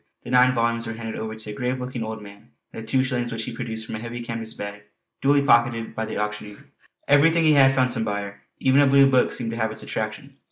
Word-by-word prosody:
the -, -, -8 dB
nine 125 Hz, 0 st, +5 dB
volumes 115 Hz, 0 st, 0 dB
were 115 Hz, -, -4 dB
handed 115 Hz, 0 st, -6 dB
over 110 Hz, 0 st, -5 dB
to 110 Hz, -1 st, -6 dB
a -, -, -6 dB
grave 125 Hz, +3 st, -2 dB
looking 125 Hz, -1 st, -5 dB
old 110 Hz, -1 st, -6 dB
man, 100 Hz, 0 st, -14 dB, 0.2 s
and -, -, -7 dB
the 110 Hz, -, -11 dB
two 130 Hz, +3 st, +3 dB
shillings 125 Hz, -2 st, -2 dB
which 115 Hz, -1 st, -3 dB
he 115 Hz, +1 st, -6 dB
produced 110 Hz, -2 st, -5 dB
from -, -, -8 dB
a 110 Hz, -, -4 dB
heavy 120 Hz, +1 st, -6 dB
canvas 115 Hz, -1 st, -5 dB
bag 100 Hz, 0 st, -7 dB, 0.4 s
duly 140 Hz, +1 st, +3 dB
pocketed 120 Hz, -3 st, +2 dB
by 110 Hz, -, -3 dB
the 110 Hz, -, -5 dB
auctioneer. 105 Hz, 0 st, -5 dB, 0.4 s
Everything 165 Hz, +4 st, +4 dB
he 155 Hz, -1 st, +5 dB
had, 135 Hz, -2 st, +5 dB
found 130 Hz, -1 st, +2 dB
some 115 Hz, -2 st, 0 dB
buyer; 100 Hz, -1 st, -4 dB, 0.2 s
even 135 Hz, +2 st, +3 dB
a 140 Hz, -, +5 dB
blue 135 Hz, 0 st, +6 dB
book 130 Hz, -2 st, +3 dB
seemed 115 Hz, -2 st, -3 dB
to 115 Hz, -, -5 dB
have 110 Hz, -1 st, -1 dB
its 110 Hz, -, -4 dB
attraction. 135 Hz, +6 st, -5 dB
115 Hz, 250 wpm, -23 LUFS, 110-130 Hz, 0.4 s, blue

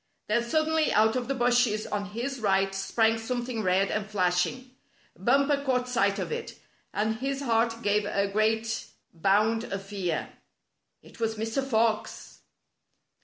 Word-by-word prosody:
Then 215 Hz, +3 st, +2 dB
suddenly 315 Hz, +5 st, +1 dB
out 220 Hz, +2 st, +3 dB
of 250 Hz, -2 st, -2 dB
the 275 Hz, -, -1 dB
bushes 240 Hz, -3 st, +2 dB
on 205 Hz, -1 st, -3 dB
his 240 Hz, +7 st, -4 dB
right 195 Hz, -2 st, +1 dB
sprang 220 Hz, +4 st, +1 dB
something 240 Hz, 0 st, -3 dB
red 190 Hz, 0 st, +2 dB
and 215 Hz, 0 st, -2 dB
flashing. 200 Hz, +6 st, 0 dB, 0.4 s
Bumper 280 Hz, +7 st, +2 dB
caught 250 Hz, -2 st, 0 dB
sight 200 Hz, -5 st, +1 dB
of -, -, -4 dB
it, 465 Hz, 0 st, -5 dB, 0.3 s
and 220 Hz, +1 st, -1 dB
his 275 Hz, +3 st, -3 dB
heart 230 Hz, -1 st, +1 dB
gave 205 Hz, 0 st, +2 dB
a 200 Hz, -1 st, 0 dB
great 220 Hz, +2 st, 0 dB, 0.3 s
bound 210 Hz, +6 st, +2 dB
of 195 Hz, -3 st, -5 dB
fear. 190 Hz, -5 st, -3 dB, 0.7 s
It -, -, -16 dB
was 225 Hz, -1 st, 0 dB
Mr. 225 Hz, +5 st, -2 dB
Fox! 225 Hz, -4 st, -1 dB
225 Hz, 145 wpm, -27 LUFS, 205-250 Hz, 0.7 s, out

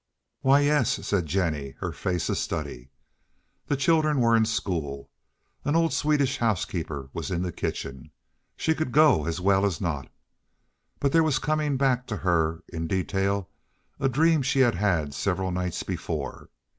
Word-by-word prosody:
"Why 135 Hz, +2 st, +4 dB
yes," 145 Hz, -4 st, +1 dB
said 90 Hz, -6 st, 0 dB
Jennie, 75 Hz, -7 st, -1 dB
her -, -, -3 dB
face 90 Hz, -2 st, -2 dB
a -, -, 0 dB
study. -, -, -4 dB, 0.8 s
The 145 Hz, -, 0 dB
children 155 Hz, 0 st, +3 dB
were 115 Hz, -1 st, +4 dB
in 110 Hz, -1 st, +4 dB
school. 80 Hz, -11 st, -3 dB, 0.5 s
An 145 Hz, -, 0 dB
old 165 Hz, -1 st, +2 dB
Swedish 145 Hz, -3 st, +1 dB
housekeeper 85 Hz, -, -2 dB
was -, -, -4 dB
in 90 Hz, -1 st, -1 dB
the 90 Hz, -, -2 dB
kitchen. 70 Hz, -2 st, -5 dB, 0.5 s
She 160 Hz, -, +1 dB
could 155 Hz, -5 st, -3 dB
go 140 Hz, -, +5 dB
as 85 Hz, +1 st, -2 dB
well 95 Hz, +1 st, +3 dB
as 100 Hz, -5 st, 0 dB
not. 80 Hz, -7 st, -3 dB, 0.9 s
But 140 Hz, -, +1 dB
there 165 Hz, -, +5 dB
was 155 Hz, -3 st, +2 dB
coming 150 Hz, -2 st, 0 dB
back 130 Hz, -2 st, +1 dB
to 105 Hz, -, -3 dB
her 85 Hz, -2 st, 0 dB
in 80 Hz, -1 st, -4 dB
detail 95 Hz, +1 st, -1 dB, 0.5 s
a 135 Hz, -, +2 dB
dream 160 Hz, +4 st, +3 dB
she 135 Hz, 0 st, +2 dB
had 120 Hz, -3 st, +4 dB
had 85 Hz, -7 st, 0 dB
several 95 Hz, +4 st, -1 dB
nights 90 Hz, -1 st, -2 dB
before. 85 Hz, -5 st, -5 dB
100 Hz, 160 wpm, -26 LUFS, 85-140 Hz, 0.9 s, go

